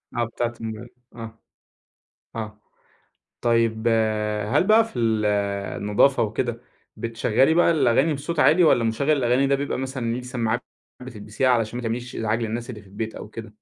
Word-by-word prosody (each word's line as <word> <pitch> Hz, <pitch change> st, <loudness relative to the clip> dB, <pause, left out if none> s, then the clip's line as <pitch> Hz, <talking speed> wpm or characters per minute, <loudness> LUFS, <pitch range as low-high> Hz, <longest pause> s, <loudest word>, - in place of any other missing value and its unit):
آه 120 Hz, -, +1 dB
بتاعة 120 Hz, +1 st, -3 dB
الموبايل. 110 Hz, +1 st, -6 dB, 0.3 s
آه، 115 Hz, -1 st, -9 dB, 1.0 s
آه. 105 Hz, -1 st, -6 dB, 0.8 s
طيب 115 Hz, -1 st, +1 dB, 0.6 s
هل 145 Hz, -, +4 dB
بقى 220 Hz, +1 st, +6 dB
في 125 Hz, -, -7 dB
ال 110 Hz, -2 st, +1 dB, 0.6 s
النضافة 115 Hz, +5 st, +3 dB
وكده 115 Hz, +2 st, -3 dB, 0.3 s
بتشغلي 115 Hz, +5 st, +1 dB
بقى 170 Hz, 0 st, +4 dB
الأغاني 140 Hz, +1 st, +3 dB
بصوت 150 Hz, +3 st, -4 dB
عالي، 175 Hz, +3 st, +5 dB
والّا 120 Hz, -7 st, +4 dB
مشغّل 115 Hz, +7 st, 0 dB
الأغاني 135 Hz, -1 st, +2 dB
ده 140 Hz, -, +3 dB
بيبقى 140 Hz, -1 st, -3 dB
مثلًا 130 Hz, -3 st, -3 dB
ليه 125 Hz, -, -4 dB
سماعات 125 Hz, -3 st, -2 dB, 0.4 s
بتلبسيها 110 Hz, +1 st, -2 dB
علشان 115 Hz, -1 st, +1 dB
ما 125 Hz, -, -5 dB
تعمليش 120 Hz, +2 st, -4 dB
إزعاج 110 Hz, +1 st, -1 dB
للناس 115 Hz, +2 st, -4 dB
اللي 110 Hz, -4 st, -7 dB
في 100 Hz, -, -19 dB
البيت 110 Hz, +3 st, -5 dB
أو -, -, -8 dB
كده؟ 110 Hz, -2 st, -10 dB
120 Hz, 160 wpm, -23 LUFS, 110-130 Hz, 1.0 s, بقى